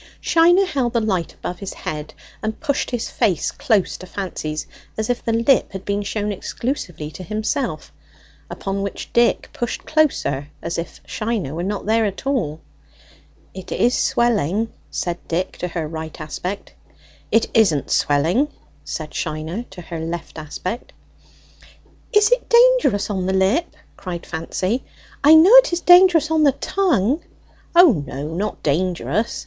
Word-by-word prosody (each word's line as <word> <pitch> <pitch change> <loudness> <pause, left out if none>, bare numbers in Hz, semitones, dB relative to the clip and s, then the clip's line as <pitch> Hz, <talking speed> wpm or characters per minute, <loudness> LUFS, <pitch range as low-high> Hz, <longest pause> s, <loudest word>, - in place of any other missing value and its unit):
Shiner 350 +3 +4
held 265 -9 -1
the 235 - +3
light 190 -6 -1
above 180 0 -6
his 195 - -6
head 150 0 -6 0.3
and 220 0 -3
pushed 285 -4 -1
his 245 -3 -2
face 200 -9 +1
close 220 -9 0
to 185 - -11
Fancy's, 155 -6 -4 0.3
as 220 +2 0
if 245 - -3
the 230 - -1
lip 230 +4 +3
had 190 0 -7
been 200 0 -1
shown 205 +1 -2
exclusively 185 - -4
to 185 - -9
himself, 215 - -3 0.6
upon 195 0 -3
which 200 0 -5
Dick 235 0 +2
pushed 240 - -4
closer, 275 - +1
as 170 0 -3
if 170 - -7
Shiner 215 - -3
were 165 - -3
not 200 +3 -3
there 225 +2 +2
at 200 +5 -4
all. 185 - -1 0.9
"It 190 -1 -9
is 245 +2 +2
swelling," 225 -2 +1 0.2
said 175 0 -3
Dick 180 +3 -1
to 180 - -2
her 165 -3 -3
right 160 0 -7
aspect. 180 +6 -5 0.6
"It 225 - +3
isn't 175 - +3
swelling," 165 - +2 0.4
said 155 -2 -6
Shiner 160 +9 -4
to 185 -2 -10
her 165 -1 -6
left 165 0 -5
aspect. 180 - -6 1.2
"Is 420 -1 +4
it - - +1
dangerous 470 - +4
on 185 -2 -2
the 190 - 0
lip?" 200 - +1 0.2
cried 175 -3 -6
Fancy. 185 +8 -2 0.4
"I 305 +3 +8
know 340 +8 +7
it - - +6
is 345 - 0
dangerous 355 -3 +6
on 320 -1 +3
the 285 -3 +5
tongue." 290 - +1 0.5
"O 350 -3 +8 0.2
no, 145 +4 -5
not 205 +5 -3
dangerous!" 180 +8 0
205 Hz, 155 wpm, -21 LUFS, 170-260 Hz, 1.2 s, I